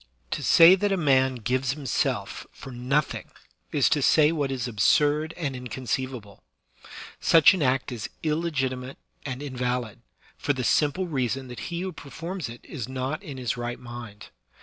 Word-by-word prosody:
To - - -2
say 165 +2 +8
that 200 +2 +1
a 195 - +2
man 130 -5 +3
gives 125 +3 -1
himself 140 -6 -2
for 135 - -11
nothing 130 +5 -1 0.4
is - - +3
to - - +2
say 155 0 +5
what 145 -4 -1
is 130 -2 -2
absurd 145 +8 +2
and 145 -6 -3
inconceivable; 125 -3 -4 0.8
such 170 +6 +6
an 185 - -2
act 130 -1 +1
is 115 -4 -5
illegiti* 150 -5 -1
mate 130 +1 -9 0.3
and 130 +1 -5
invalid, 125 -4 -3 0.4
for 145 - +1
the 130 -2 -3
simple 150 +9 +2
reason 130 -4 -2
that 125 - -8
he 170 0 -3
who 190 0 -3
per 145 -4 -12
forms 170 -2 -5
it 120 +1 -10
is 130 -5 -6
not 130 +3 -3
in 140 -4 -8
his 125 -2 -2
right 120 0 -4
mind. 120 -4 -9
130 Hz, 170 wpm, -26 LUFS, 125-155 Hz, 0.8 s, say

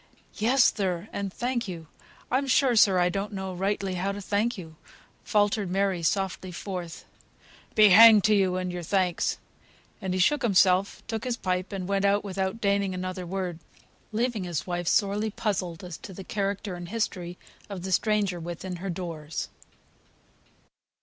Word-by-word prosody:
"Yes, 245 +4 +4
sir, 185 -2 -2
and 200 -1 -3
thank 240 +1 -2
you. 170 -3 -7 0.5
I'm 270 +2 +1
sure, 260 -2 +3
sir, 195 -4 +5
I 180 0 +3
don't 200 +3 -3
know 190 -1 -4
rightly 195 +1 -1
how 185 +2 -1
to 200 - -6
thank 210 +4 -1
you," 160 -4 -9 0.5
faltered 205 -2 +1
Mary, 190 -1 0
softly 190 +2 -1
forth. 175 -2 -6 0.7
"Be 215 -1 +7
hanged 215 +1 +9
to 215 - +4
you 190 -3 +2
and 185 -1 -2
your 175 0 -5
thanks." 180 0 0 0.6
And 185 -1 -2
he - - -1
shook 290 +10 +3
himself, 195 -4 +3
took 225 0 -4
his 245 -2 -2
pipe, 185 -1 -2
and 190 -2 -4
went 200 0 0
out 200 +1 +3
without 190 +1 -3
deigning 200 -2 +1
another 185 0 -4
word; 180 -2 -3 0.5
leaving 225 -2 -1
his 170 -7 -3
wife 175 -1 -3
sorely 205 +2 +2
puzzled 190 -6 -3
as 180 -3 -7
to 195 - -10
the 195 - -8
character 200 0 -3
and 175 -1 -7
history 180 -5 -3 0.3
of 190 -3 -6
the 190 - -4
stranger 205 -2 +1
within 175 +2 -6
her 190 +3 -5
doors. 165 -3 -5
195 Hz, 165 wpm, -27 LUFS, 180-210 Hz, 0.7 s, hanged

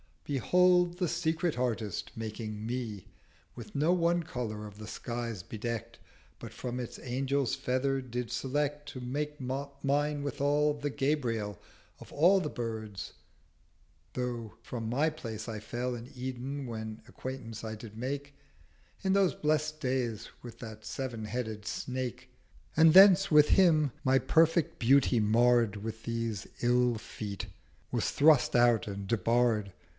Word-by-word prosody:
'Behold, 180 +5 +3
the 180 -3 0
Secret 165 -2 0
Artist, 115 -5 -2
making 110 -1 -5
me, 115 -5 -4 0.5
With 110 -3 -10
no 150 +4 +3
one 170 -1 +2
Colour 110 -8 -4
of 105 0 -11
the 110 - -8
skies 115 -4 -4
bedeckt, 115 +2 -5 0.4
But - - -9
from 125 0 -4
its 120 - -6
Angel's 135 +1 -1
Feathers 130 +1 0
did 120 0 -3
select 145 +4 -1
To 130 - -7
make 145 +4 -2
up 140 +1 -5
mine 145 +1 +1
withal, 145 +1 +1
the 145 0 -3
Gabriel 120 -8 -1 0.4
Of - - -13
all 180 +6 +5
the 150 - -2
Birds: 110 -6 -5 1.0
though 120 -3 -3
from 115 -3 -4
my 145 +7 +2
Place 115 -7 -6
I 110 -1 -4
fell 120 +4 -3
In 120 +1 -7
Eden, 130 +2 -4
when 110 -2 -6
Acquaintance 130 -4 -7
I 110 -1 -4
did 110 0 -10
make 140 +4 -4 0.7
In 190 - +2
those 195 -2 +3
blest 155 0 0
days 125 -5 -1
with 115 -2 -10
that 110 -2 -9
Sev'n 120 -5 -4
headed 110 -2 -4
Snake, 130 -1 -4 0.5
300 - - -19
And 160 0 +7
thence 195 0 +8
with 150 -1 +6
him, 155 -7 +5
my 130 0 +4
perfect 165 +3 +3
Beauty 130 0 +4
marr'd 115 0 +4
With 110 +2 -6
these 115 -2 -3
ill 125 0 +3
Feet, 105 -2 -6 0.4
was - - 0
thrust 145 -4 +4
out 120 -3 +4
and 100 -1 -5
debarr'd. 115 -1 +2
125 Hz, 145 wpm, -31 LUFS, 115-145 Hz, 1.0 s, thence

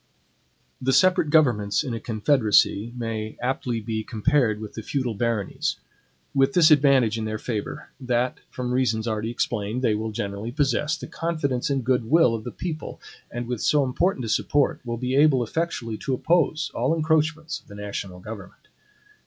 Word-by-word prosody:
The 130 +1 +1
separate 185 -3 +4
governments 120 -10 +3
in 130 -5 -4
a 115 - -3
confederacy 110 -2 +2
may 110 -2 -4
aptly 125 -1 -1
be 110 0 -3
compared 115 -1 +1
with 110 -1 -8
the 110 - -6
feudal 125 0 -2
baronies; 110 -2 -1 0.6
with 135 +6 +3
this 170 -4 +6
advantage 135 -6 +4
in 110 - -3
their 110 0 -2
favor, 110 -2 -5
that 125 -1 -1
from 125 -1 -4
the - - -1
reasons 115 -3 +1
already 110 0 -2
explained, 115 0 -2
they 115 - +3
will 110 +1 -2
generally 100 +2 -4
possess 150 +3 0
the - - -7
confidence 145 -7 -2
and 135 -2 0
good 125 -2 +1
will 165 -6 +5
of 110 -1 -4
the 120 - -4
people, 160 -4 -6 0.3
and 120 0 -4
with 125 -3 -3
so 150 -1 +3
important 130 +1 0
a - - -4
support, 145 +5 +1
will 120 -1 -4
be 125 +2 -2
able 140 -3 +5
effectually 120 -5 -3
to 135 - -1
oppose 155 0 +1
all 165 - +1
encroachments 160 0 0
of - - -28
the 100 - -11
national 100 -3 -6
government. 105 -2 -10
125 Hz, 175 wpm, -24 LUFS, 110-145 Hz, 0.6 s, this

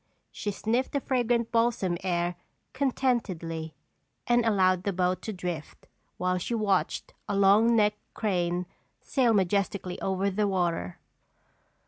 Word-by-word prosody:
She 210 - -4
sniffed 225 +5 -1
the 280 - +2
fragrant 240 -3 0
balsam 230 -6 +1
air 175 -1 0 0.4
contentedly 200 - -1 0.5
and 240 0 +3
allowed 185 -5 +3
the 200 - -1
boat 180 0 0
to 220 - -4
drift 175 -6 -6 0.3
while 180 0 0
she 235 +6 -2
watched 200 -4 0 0.2
a 200 - 0
long 205 +4 +5
necked 210 -1 +2
crane 180 -4 0 0.4
sail 255 -4 +2
majestically 195 -2 0
over 195 +1 0
the 205 +2 +1
water. 170 - -1
195 Hz, 125 wpm, -28 LUFS, 180-230 Hz, 0.5 s, long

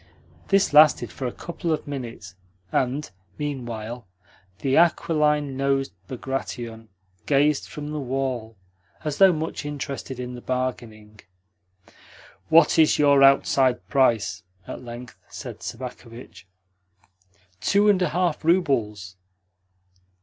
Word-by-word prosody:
This 195 -5 +2
lasted 150 0 +6
for 130 - -4
a - - -3
couple 170 +3 -5
of 155 - -1
minutes, 120 -9 -7 0.4
and, 135 +4 0 0.3
meanwhile, 120 -6 -5 0.5
the 135 0 +1
aquiline 150 -4 +2
nosed 135 0 0
Bagration 120 -3 -5 0.4
gazed 145 +1 +2
from 150 0 -7
the 150 - -3
wall 130 -4 -3 0.5
as 150 -2 -3
though 195 -1 +8
much 160 -1 -4
interested 140 -3 -5
in 125 0 -5
the 120 - -8
bargaining. 115 -5 -4 1.3
"What 165 +1 +5
is 155 - +5
your 140 -1 +5
outside 135 -2 +4
price?" 125 -6 +2 0.3
at - - -7
length 120 +1 -10
said - - -8
Sobakevitch. 115 -5 -9 1.1
"Two 205 - +3
and 200 -3 +4
a 180 - +2
half 175 -3 -1
roubles." 115 - 0
135 Hz, 115 wpm, -24 LUFS, 120-150 Hz, 1.3 s, though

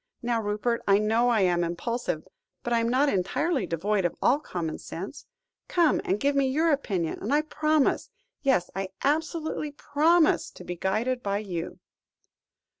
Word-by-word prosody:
Now, 235 -1 0
Rupert, 215 +3 -1
I 200 0 +6
know 225 +3 +2
I 225 -4 +3
am 175 -2 +2
impulsive, 175 0 -3 0.4
but 240 - -1
I 235 - +3
am 230 0 0
not 265 +4 +3
entirely 255 - 0
devoid 195 +5 0
of 175 - 0
all 270 +4 +3
common 170 - -4
sense. 195 - -8 0.4
Come 340 -3 +3
and 195 +3 0
give 280 +3 +1
me 275 -1 +3
your 315 +5 +2
opinion, 195 - -1
and - - -3
I 295 +1 +3
promise 310 -1 +1 0.3
yes, 260 - +1
I 195 -1 -3
absolutely 310 0 -1
promise 315 +3 +3
to - - -11
be 175 - -5
guided 225 +8 -1
by 200 -3 -1
you." 180 -5 -5
235 Hz, 165 wpm, -27 LUFS, 190-285 Hz, 0.4 s, I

